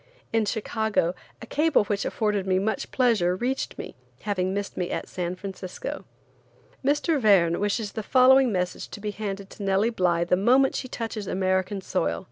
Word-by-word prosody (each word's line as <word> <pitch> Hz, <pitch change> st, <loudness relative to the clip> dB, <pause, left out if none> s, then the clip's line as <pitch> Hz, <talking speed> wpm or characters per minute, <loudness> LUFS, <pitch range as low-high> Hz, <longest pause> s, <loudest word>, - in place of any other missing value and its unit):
In 225 Hz, -1 st, +2 dB
Chicago, 220 Hz, -4 st, 0 dB, 0.3 s
a -, -, -6 dB
cable 300 Hz, +1 st, +2 dB
which 205 Hz, 0 st, -2 dB
afforded 210 Hz, -3 st, -1 dB
me 185 Hz, -1 st, +2 dB
much 210 Hz, +3 st, -1 dB
pleasure 220 Hz, -9 st, +2 dB
reached 255 Hz, +7 st, -2 dB
me, -, -, -7 dB, 0.3 s
having 185 Hz, -3 st, -1 dB
missed 200 Hz, 0 st, -3 dB
me 180 Hz, -1 st, -2 dB
at -, -, -3 dB
San 180 Hz, 0 st, -3 dB
Francisco. 195 Hz, -, -6 dB, 0.8 s
"Mr. 290 Hz, +2 st, +1 dB
Verne 180 Hz, -6 st, +4 dB
wishes 205 Hz, +1 st, -1 dB
the 220 Hz, -, -4 dB
following 260 Hz, +3 st, +5 dB
message 180 Hz, -2 st, -2 dB
to -, -, -8 dB
be 210 Hz, 0 st, -3 dB
handed 200 Hz, -2 st, -5 dB
to -, -, -11 dB
Nellie 195 Hz, +3 st, +2 dB
Bly 175 Hz, -5 st, +1 dB
the 175 Hz, +1 st, +2 dB
moment 255 Hz, +8 st, +4 dB
she 255 Hz, -, -3 dB
touches 225 Hz, -4 st, -5 dB
American 190 Hz, +1 st, 0 dB
soil: 85 Hz, -, -1 dB
M. -, -, -6 dB
205 Hz, 175 wpm, -26 LUFS, 185-230 Hz, 0.8 s, following